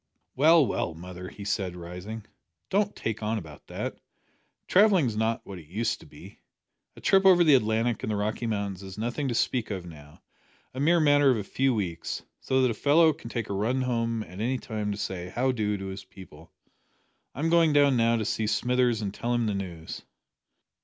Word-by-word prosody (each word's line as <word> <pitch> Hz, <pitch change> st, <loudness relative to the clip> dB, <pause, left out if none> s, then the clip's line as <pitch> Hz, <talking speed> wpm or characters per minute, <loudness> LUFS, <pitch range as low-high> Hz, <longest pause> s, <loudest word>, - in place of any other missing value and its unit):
"Well, 155 Hz, +2 st, +6 dB
well, 85 Hz, -, -2 dB
mother," 90 Hz, +2 st, -8 dB
he 100 Hz, -, -10 dB
said, 95 Hz, -3 st, -2 dB
rising, 90 Hz, +6 st, -8 dB, 0.5 s
"don't 205 Hz, +1 st, +1 dB
take 110 Hz, -1 st, -3 dB
on 110 Hz, +1 st, -1 dB
about 80 Hz, -7 st, -10 dB
that. -, -, -5 dB, 0.7 s
Travelling 195 Hz, -5 st, +5 dB
is 115 Hz, -3 st, -2 dB
not 110 Hz, +1 st, 0 dB
like -, -, -45 dB
what 95 Hz, -2 st, -8 dB
it 80 Hz, -, -15 dB
used 110 Hz, +7 st, -1 dB
to -, -, -15 dB
be. -, -, -14 dB, 0.6 s
A -, -, -12 dB
trip 195 Hz, 0 st, +4 dB
over 185 Hz, -2 st, +7 dB
the 155 Hz, -3 st, +5 dB
Atlantic 115 Hz, -1 st, +2 dB
and -, -, -2 dB
the -, -, 0 dB
Rocky 110 Hz, +3 st, -2 dB
Mountains 100 Hz, -3 st, -3 dB
is 95 Hz, 0 st, -9 dB
nothing 120 Hz, +6 st, -2 dB
to 120 Hz, -, -1 dB
speak 120 Hz, 0 st, 0 dB
of 95 Hz, -4 st, -4 dB
now 75 Hz, -3 st, -13 dB, 0.5 s
a 130 Hz, -, -6 dB
mere 165 Hz, +5 st, +4 dB
matter 145 Hz, -2 st, +5 dB
of 125 Hz, -, +3 dB
a 105 Hz, -, -3 dB
few 130 Hz, +5 st, 0 dB
weeks 85 Hz, -6 st, -3 dB, 0.2 s
so 130 Hz, 0 st, +1 dB
that 125 Hz, -, +3 dB
a -, -, -1 dB
fellow 155 Hz, +7 st, +4 dB
can 140 Hz, -6 st, -10 dB
take 115 Hz, -2 st, -3 dB
a -, -, -1 dB
run 115 Hz, +7 st, 0 dB
home 115 Hz, -2 st, -1 dB
at 90 Hz, +1 st, -11 dB
any 130 Hz, +3 st, 0 dB
time 105 Hz, -4 st, -4 dB
to 100 Hz, -, -4 dB
say 90 Hz, -3 st, -4 dB
`How 130 Hz, +2 st, +2 dB
do' 105 Hz, -3 st, -1 dB
to 95 Hz, -, -6 dB
his 95 Hz, 0 st, -6 dB
people. 85 Hz, -4 st, -14 dB, 0.8 s
I'm 160 Hz, +6 st, -1 dB
going 165 Hz, -2 st, +5 dB
down 145 Hz, -2 st, +4 dB
now 115 Hz, 0 st, +3 dB
to 110 Hz, -2 st, -1 dB
see 110 Hz, 0 st, -1 dB
Smithers 125 Hz, -1 st, +1 dB
and 100 Hz, -1 st, -3 dB
tell 120 Hz, +3 st, -2 dB
him 120 Hz, -1 st, +1 dB
the 105 Hz, -, 0 dB
news." 90 Hz, -5 st, -6 dB
110 Hz, 210 wpm, -27 LUFS, 100-130 Hz, 0.8 s, over